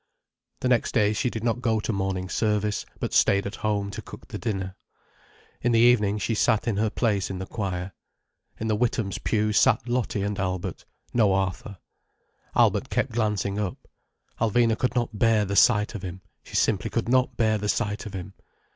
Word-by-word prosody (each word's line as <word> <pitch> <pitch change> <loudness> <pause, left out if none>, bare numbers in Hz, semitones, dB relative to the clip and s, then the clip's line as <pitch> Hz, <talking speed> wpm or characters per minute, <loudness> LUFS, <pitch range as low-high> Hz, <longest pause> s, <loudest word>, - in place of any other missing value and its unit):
The 130 - 0
next 125 -2 +2
day 105 -1 +3
she 120 +3 0
did 110 -2 -5
not 120 +1 0
go 115 -3 +1
to 110 - -2
Morning 95 -1 -2
Service, 105 +1 0
but - - -3
stayed 100 0 +4
at 100 - -5
home 100 -2 -1
to - - -6
cook - - -12
the - - -6
dinner. 95 -4 -3 0.9
In 120 0 +2
the 115 - +4
evening 110 -4 +4
she 115 - -1
sat 110 +1 +2
in 110 -4 0
her 110 +1 +2
place 105 -4 0
in 95 - -4
the 95 - -5
choir. 95 -3 -4 0.7
In 110 - -2
the 110 - +2
Withams' 110 -3 -1
pew 105 -1 +1
sat 110 - +3
Lottie 120 -4 -1
and 100 0 -2
Albert—no 95 +3 -1
Arthur. 95 +3 -2 0.8
Albert - - +3
kept - - 0
glancing 105 -3 -1
up. 100 -4 -4 0.5
Alvina 115 0 +3
could 125 +2 -1
not 120 -3 -1
bear 110 -2 +4
the 100 +1 -3
sight 105 -1 +4
of 105 - -6
him—she 95 0 -10
simply 100 -5 +1
could 115 - -2
not 130 0 +2
bear 110 -2 +2
the 105 0 -2
sight 105 -2 -1
of 100 - -8
him. 95 +1 -7
105 Hz, 185 wpm, -25 LUFS, 100-115 Hz, 0.9 s, stayed